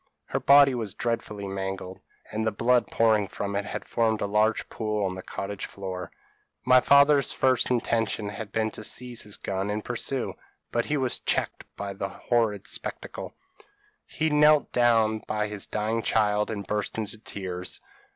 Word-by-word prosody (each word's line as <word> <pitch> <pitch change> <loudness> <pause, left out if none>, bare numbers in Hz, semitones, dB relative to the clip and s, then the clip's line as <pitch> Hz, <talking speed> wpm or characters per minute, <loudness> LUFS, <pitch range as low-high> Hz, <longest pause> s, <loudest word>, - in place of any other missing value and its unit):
Her - - -2
body 140 -1 +7
was 110 -6 -3
dreadfully 110 -4 -3
mangled, 95 -1 -5 0.3
and 110 +1 -2
the - - +2
blood 120 +3 +2
pouring 110 -3 +3
from 100 +1 -4
it 100 0 -1
had - - -5
formed 110 -2 +1
a - - -1
large 105 +2 +1
pool 105 -2 -2
on 95 - -1
the 95 - -7
cottage 100 +1 -5
floor. 95 -2 -6 0.5
My 130 0 +7
father's 140 +1 +5
first 130 -2 +2
intention 115 -3 0
had 100 0 -7
been 110 0 0
to 110 - -8
seize 125 +1 -2
his 105 -1 -4
gun 95 +1 -3
and 105 +1 -3
pursue; 125 +1 -1 0.4
but 120 0 0
he 150 - 0
was 130 -3 0
checked - - -1
by 100 -1 -5
this 95 0 -5 0.2
horrid 110 -5 +2
spectacle; - - -4 0.7
he 160 0 -1
knelt 150 0 +5
down 115 -3 +3
by 105 0 0
his 105 -1 -5
dying 110 +2 -1
child, 105 -2 +2
and 100 -3 -4
burst 105 +2 -2
into 110 -1 -4
tears. 90 -4 -4
110 Hz, 170 wpm, -27 LUFS, 100-120 Hz, 0.7 s, body